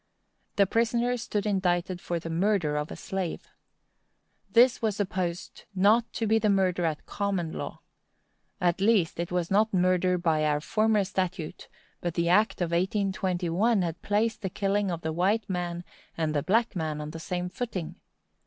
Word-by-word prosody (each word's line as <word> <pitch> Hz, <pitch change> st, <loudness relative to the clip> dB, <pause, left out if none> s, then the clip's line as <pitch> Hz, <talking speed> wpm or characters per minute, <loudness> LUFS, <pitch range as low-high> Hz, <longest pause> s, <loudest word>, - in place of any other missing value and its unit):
The 200 Hz, -, +5 dB
prisoner 235 Hz, +4 st, +1 dB
stood 215 Hz, -4 st, -3 dB
indicted 185 Hz, -3 st, 0 dB
for 175 Hz, -, -2 dB
the 165 Hz, 0 st, -6 dB
murder 175 Hz, -3 st, +1 dB
of 150 Hz, +1 st, -2 dB
a -, -, -6 dB
slave. 190 Hz, -3 st, -4 dB, 1.0 s
This 245 Hz, +1 st, +5 dB
was 220 Hz, -3 st, 0 dB
supposed 185 Hz, -3 st, -3 dB
not 215 Hz, +5 st, +3 dB
to 225 Hz, -, -1 dB
be 220 Hz, +1 st, +3 dB
murder 190 Hz, -4 st, +2 dB
at 155 Hz, -2 st, -2 dB
common 195 Hz, -5 st, -2 dB
law. -, -, -6 dB, 0.8 s
At 180 Hz, -1 st, +1 dB
least, 200 Hz, -7 st, +2 dB
it 170 Hz, 0 st, -3 dB
was 180 Hz, -1 st, -1 dB
not 215 Hz, +3 st, +3 dB
murder 180 Hz, 0 st, +2 dB
by 160 Hz, -3 st, +1 dB
our 150 Hz, -1 st, +2 dB
former 215 Hz, +5 st, +2 dB
statute; 185 Hz, -3 st, -4 dB, 0.3 s
but 175 Hz, -1 st, -3 dB
the 170 Hz, 0 st, +1 dB
act 210 Hz, +2 st, +3 dB
of 170 Hz, -1 st, 0 dB
1821 190 Hz, +2 st, +1 dB
had 165 Hz, -1 st, -4 dB
placed 220 Hz, +3 st, 0 dB
the 190 Hz, -, -2 dB
killing 200 Hz, +1 st, 0 dB
of 170 Hz, -2 st, -3 dB
the 160 Hz, -1 st, -2 dB
white 195 Hz, +5 st, +1 dB
man 175 Hz, -2 st, -3 dB, 0.3 s
and 160 Hz, -2 st, 0 dB
the 145 Hz, -, +1 dB
black 225 Hz, +6 st, +1 dB
man 155 Hz, -3 st, -2 dB
on 150 Hz, 0 st, -5 dB
the 165 Hz, -, -7 dB
same 180 Hz, +1 st, -3 dB
footing. 190 Hz, -5 st, -4 dB
185 Hz, 165 wpm, -27 LUFS, 170-210 Hz, 1.0 s, The